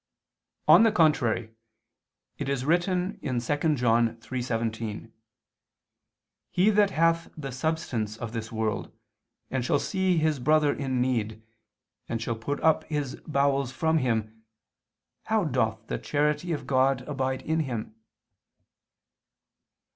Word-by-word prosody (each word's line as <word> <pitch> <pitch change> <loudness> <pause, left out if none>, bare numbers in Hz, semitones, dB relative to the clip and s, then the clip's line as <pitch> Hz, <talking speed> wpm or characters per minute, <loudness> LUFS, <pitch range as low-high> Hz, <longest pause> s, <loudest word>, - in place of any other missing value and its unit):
On - - +8
the 225 -1 +5
contrary, 130 - +2 0.9
It 140 -2 -3
is 135 -2 -1
written 180 +3 +1
2 145 +5 0
John 115 -2 +2
3:17: 115 -2 -4 1.4
"He 190 +4 +3
that 205 -1 +4
hath 165 -2 +1
the 140 -3 -5
substance 125 -6 -2
of 115 -1 -5
this 115 -1 -5
world, 110 -2 -2 0.6
and 130 -2 -1
shall 130 - +2
see 190 +3 0
his 155 -3 +1
brother 150 +2 +3
in 130 -3 -1
need, 110 -4 -1 0.7
and 115 - -2
shall 115 +1 -2
put 140 +6 -3
up 160 -1 +3
his 145 -4 -3
bowels 140 -3 +1
from 160 +4 +1
him, 110 -4 -2 0.8
how 220 -1 +1
doth 110 -7 -1
the - - -3
charity 150 +3 0
of 150 -3 -3
God 130 0 +2
abide 130 -2 -2
in 160 +1 0
him?" 120 -8 -3
135 Hz, 125 wpm, -27 LUFS, 115-155 Hz, 1.4 s, On